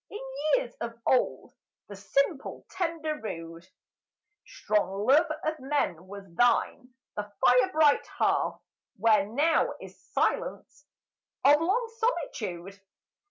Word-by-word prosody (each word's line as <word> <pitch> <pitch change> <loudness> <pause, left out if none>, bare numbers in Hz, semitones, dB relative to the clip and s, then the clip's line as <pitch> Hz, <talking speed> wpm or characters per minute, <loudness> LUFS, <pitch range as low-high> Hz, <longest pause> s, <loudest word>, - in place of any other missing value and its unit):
In 415 - -7 0.4
years - - -4
of 235 0 -5
old 255 - +1 0.3
The 205 - -9
simple, 275 - -1
tender, 320 -4 -3
rude, 165 -3 -7 0.8
Strong 210 - -1
love 290 +7 +5
of 310 0 -2
men 260 - -2
was 200 +1 -9
thine, 245 +4 +1 0.2
the 205 0 -5
fire 250 +1 +5
bright 305 -2 +3
hearth - - 0 0.4
Where 210 -1 +3
now 290 +9 +1
is - - -12
silence 285 - -2 0.6
of 295 +2 +6
long 425 +8 +1
solitude. 200 - -3
250 Hz, 115 wpm, -28 LUFS, 200-310 Hz, 0.8 s, of